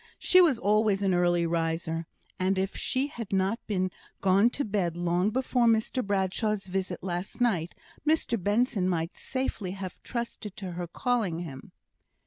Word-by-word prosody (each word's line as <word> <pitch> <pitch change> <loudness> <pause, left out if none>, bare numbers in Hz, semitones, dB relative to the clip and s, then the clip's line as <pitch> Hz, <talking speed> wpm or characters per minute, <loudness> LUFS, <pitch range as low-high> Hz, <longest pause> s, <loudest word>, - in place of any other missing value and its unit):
She 365 - +6
was 310 -9 +4
always 210 -1 +2
an 190 -2 +3
early 175 -1 +3
riser; 165 0 -1 0.3
and 190 +1 +1
if 190 +1 -1
she 260 +2 0
had 235 -7 -7
not 195 +4 +1
been 185 -3 0 0.3
gone 195 +4 +4
to 280 +3 -2
bed 190 -5 -1
long 175 +3 +1
before 250 0 +1
Mr 225 +3 +2
Bradshaw's 200 +1 0
visit 185 -2 -3
last 180 +3 -4
night, 180 -9 +1 0.3
Mr 300 -8 +1
Benson 205 -2 +2
might 165 -1 -1
safely 245 -8 -3
have 190 -2 -7
trusted 235 -4 -5
to 190 -3 -5
her 175 0 -4
calling 200 -3 0
him. 135 -6 -8
195 Hz, 155 wpm, -28 LUFS, 175-225 Hz, 0.3 s, She